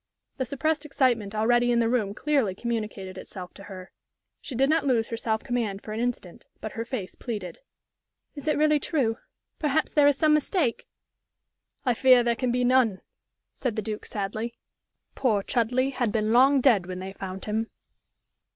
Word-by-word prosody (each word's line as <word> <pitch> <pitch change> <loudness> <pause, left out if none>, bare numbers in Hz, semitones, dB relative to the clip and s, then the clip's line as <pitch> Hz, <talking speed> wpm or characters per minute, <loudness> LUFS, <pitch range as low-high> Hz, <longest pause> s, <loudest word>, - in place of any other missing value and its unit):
The 260 - -1
suppressed 300 +4 -1
excitement 245 -8 0
already 240 +3 +3
in 240 - +3
the 230 -1 +3
room 220 -4 0
clearly 270 -11 +1
communicated 210 -5 -4
itself 180 -3 -9
to 200 - -12
her. 185 -2 -10 0.5
She 265 - -6
did 270 +3 +3
not 315 +1 +2
lose 230 -4 +2
her 230 - -2
self 220 -1 -1
command 225 -5 -2
for 215 - -6
an 220 - -3
instant, 235 -7 -4
but 220 - -5
her 230 - -4
face 230 -7 -5
pleaded. 210 -7 -6 0.7
"Is 290 0 -9
it 305 - +2
really 305 0 +4
true? 255 -7 0 0.4
Perhaps 305 0 0
there 290 -1 +5
is 285 -2 +3
some 310 0 +4
mistake?" 300 - 0 1.0
"I 250 - +3
fear 255 0 +6
there 235 0 +2
can 250 +1 -1
be 250 +1 +1
none," 245 -6 +3 0.5
said 245 -5 -3
the 215 - -1
Duke, 215 -1 -5
sadly. 215 +3 -4 0.6
"Poor 215 -7 +1
Chudleigh 250 +5 +1
had 245 -4 -1
been 215 +1 +1
long 265 +3 +6
dead 220 -9 +4
when 185 -1 -5
they 190 +1 -6
found 190 -1 -7
him." 220 +2 -1
235 Hz, 180 wpm, -26 LUFS, 210-265 Hz, 1.0 s, fear